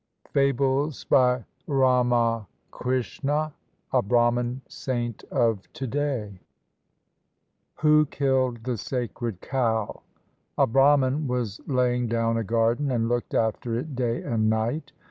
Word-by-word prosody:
FABLES 140 +1 +1
BY 125 -3 +3 0.2
RAMAKRISHNA, 125 - 0 0.4
A - - +4
BRAHMAN 120 +3 +1
SAINT 120 -4 -4
OF 115 -4 0
TO 135 - -5
DAY 125 -7 -2 1.4
WHO 150 0 +5
KILLED 130 -4 0
THE 125 -1 -2
SACRED 120 -5 -4
COW? 115 -5 -1 0.6
A - - +5
Brahman 135 +3 +3
was 120 -5 -2
laying 125 -2 +1
down 115 0 0
a 115 - 0
garden 115 +6 +1
and 115 -3 0
looked 120 0 -2
after 115 +1 0
it 140 +3 -5
day 120 -2 -1
and 110 -2 +1
night. 115 +8 -1
125 Hz, 110 wpm, -25 LUFS, 115-135 Hz, 1.4 s, WHO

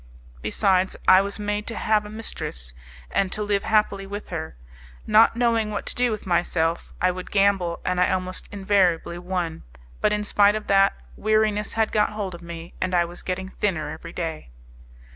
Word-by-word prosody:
Besides, 190 - +1
I 185 +1 +8
was 200 0 -3
made 210 0 -2
to 230 - -4
have 215 -1 +1
a - - -10
mistress, 65 - -5 0.4
and 195 -2 +1
to 210 - -2
live 205 -1 +1
happily 205 -2 +1
with 205 +1 -7
her. 160 - -5 0.5
Not 220 +2 +5
knowing 230 -2 +2
what 210 - -4
to - - -2
do 245 0 +2
with 215 -2 -4
myself, 170 -2 0
I 185 +1 +3
would 185 0 -7
gamble, 195 -4 +2
and 180 0 +1
I - - +4
almost 185 0 -3
invariably 190 -4 +1
won; 175 -2 -3 0.4
but, - - +3
in 210 0 0
spite 205 0 +4
of 215 - -4
that, 195 0 +4 0.2
weariness 215 -1 +1
had 220 -1 +1
got 210 0 +2
hold 200 -3 -4
of 170 - -9
me 170 0 -8
and 185 0 0
I 175 -1 +4
was 175 +1 -9
getting 190 0 -4
thinner 165 -8 -2
every 165 +1 -8
day. 160 - -5
195 Hz, 185 wpm, -24 LUFS, 175-210 Hz, 0.5 s, I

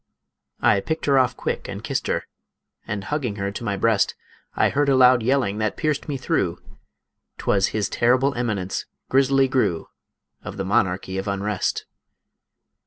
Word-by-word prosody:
I 100 - +4
picked 160 +11 -3
her 140 -2 +4
off 125 -2 +1
quick - - -3
and - - -7
kissed - - -2
her, - - 0 0.6
And, 100 -1 -3
hugging 130 -3 -2
her 100 -1 -3
to 105 - -7
my 100 -3 -1
breast, 110 0 +2 0.4
I - - +3
heard 145 0 +1
a 135 - +4
loud 125 -1 +6
yelling 115 -4 +1
that 110 -1 -1
pierced 155 -2 -1
me 140 - -1
through, 90 -8 0 0.8
'Twas 95 -1 +2
His 105 -2 -1
Terrible 130 +4 +2
Eminence, 105 -7 -2 0.2
Grizzly 135 0 +4
Gru, 125 -11 0 0.5
Of 100 - -7
the 95 - -2
Monarchy 95 0 0
of 95 - -5
Unrest. 100 0 -1
110 Hz, 160 wpm, -23 LUFS, 100-135 Hz, 0.8 s, loud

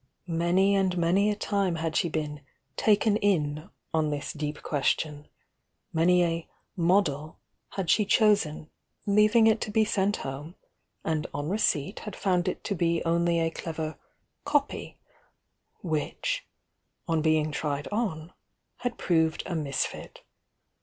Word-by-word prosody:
Many 175 +3 +2
and 190 -2 +1
mony 180 +5 +3
a 210 - 0
time 200 -4 0
had 160 -1 -2
she 170 - +2
been 150 -2 -3 0.3
"taken 210 0 +3
in," 160 -6 0 0.2
on 155 -1 +2
this 145 +1 -3
deep 150 -1 -4
quc. 145 -3 +1
tion, 150 -1 -6 0.3
— - - -49
many 175 +2 +4
a 165 -1 -1 0.3
"model" 165 -4 +1 0.4
had 195 -3 -3
she 210 - +4
cho.^en. 200 -8 +2 0.4
leaving 210 +2 +5
it 220 0 +4
to - - -2
be 220 +1 +3
sent 205 0 +1
home, 145 +6 -6 0.5
and 155 -2 -1
on 145 +2 -2
receipt 190 -4 0
had 210 -3 -7
found 180 -3 +1
it - - -2
to 205 - -1
be 170 -2 0
only 170 0 +2
a 165 0 +1
clever 160 -1 -4 0.5
"copy" 290 -1 -1 0.9
which, 185 - -2 0.6
on 165 -2 +1
being 155 -1 +2
tried 145 -1 -2
on, 185 -7 -2 0.4
had 245 -1 -3
proved 160 -2 +1
a 180 - -4
misfit. 145 -5 -3
170 Hz, 140 wpm, -28 LUFS, 155-200 Hz, 0.9 s, leaving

